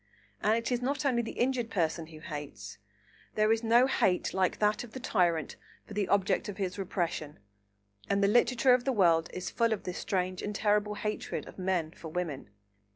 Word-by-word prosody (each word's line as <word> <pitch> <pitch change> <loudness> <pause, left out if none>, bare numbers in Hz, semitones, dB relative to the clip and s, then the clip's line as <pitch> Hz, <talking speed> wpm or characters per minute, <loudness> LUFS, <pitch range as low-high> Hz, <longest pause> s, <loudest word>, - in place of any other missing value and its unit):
And 215 +1 +3
it 230 +2 -3
is 245 0 0
not 275 +3 -1
only 250 -4 +2
the 225 - -6
injured 245 -2 0
person 165 -4 -1
who 155 -1 -12
hates; 135 - -7 0.6
there 215 0 +3
is 225 0 +2
no 235 +2 +5
hate 190 -8 +1
like 190 -1 +1
that 210 +2 +1
of 235 - -12
the 260 - -6
tyrant 175 - 0 0.3
for - - -10
the 200 -2 0
object 200 +2 +1
of 200 - -6
his 190 -1 -3
repression, 170 -5 -3 0.7
and 200 0 +2
the - - +5
literature 245 +3 +4
of 250 0 +2
the 270 - +1
world 170 -6 +3
is 180 -1 -5
full 230 -1 +1
of 220 - -1
this 180 - -4
strange 185 -1 -1
and 205 0 -4
terrible 210 0 +1
hatred 210 +1 -4
of - - -12
men 180 -4 0
for 165 - -10
women. 155 - -4
200 Hz, 200 wpm, -30 LUFS, 175-230 Hz, 0.7 s, no